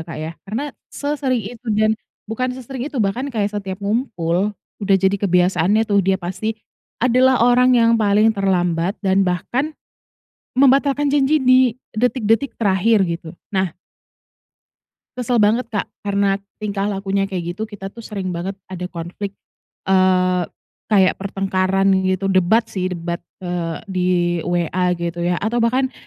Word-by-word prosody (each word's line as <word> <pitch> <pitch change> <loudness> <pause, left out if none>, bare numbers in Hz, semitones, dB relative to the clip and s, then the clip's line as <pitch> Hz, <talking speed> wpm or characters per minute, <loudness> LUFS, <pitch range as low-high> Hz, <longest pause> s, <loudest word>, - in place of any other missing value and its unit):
Kak, 165 0 -7
ya, 155 +2 -5 0.2
karena 275 +7 -3 0.2
sesering 275 -6 -2
itu 240 +3 -10
dan 215 0 +3 0.3
bukan 250 +3 -3
sesering 260 +1 -6
itu 300 - -9
bahkan 240 +8 -2
kayak 210 -5 -1
setiap 195 -2 -4
ngumpul, 205 -3 -1 0.2
udah 200 -1 +3
jadi 190 +1 +1
kebiasaannya 185 +2 +3
tuh 205 -2 +2
dia 190 0 +2
pasti 190 +4 -4 0.5
adalah 255 +1 +4
orang 250 +1 +5
yang 230 -1 +4
paling 210 +1 +4
terlambat 180 -3 0
dan 190 0 +3
bahkan 240 - -1 0.8
membatalkan 280 +1 +4
janji 285 +2 +3
di 255 -1 +5 0.2
detik-detik 240 +2 +1
terakhir 200 0 +3
gitu. 170 -1 -5 0.2
Nah. 190 -3 0 1.4
Kesel 245 0 0
banget, 225 +3 +3
Kak, 210 -4 -3
karena 200 -1 0 0.2
tingkah 205 -1 -2
lakunya 195 0 -1
kayak 175 -3 -3
gitu 215 +4 -5
kita 195 -2 -8
tuh 235 - -11
sering 195 -5 -4
banget 180 +3 -4
ada 180 -1 -6
konflik, 185 +4 -6 0.5
eee, 185 -1 +3 0.4
kayak 190 -4 +4
pertengkaran 195 -1 0 0.2
gitu, 190 +1 0
debat 190 +5 +3
sih 185 -4 -3
debat, 170 0 -4 0.2
eee, 175 -2 -2 0.2
di 180 -1 0 0.4
WA 175 +1 0
gitu 170 0 -4
ya 175 +1 +1
atau 225 +6 -1
bahkan 255 +3 +1
200 Hz, 140 wpm, -20 LUFS, 185-230 Hz, 1.4 s, orang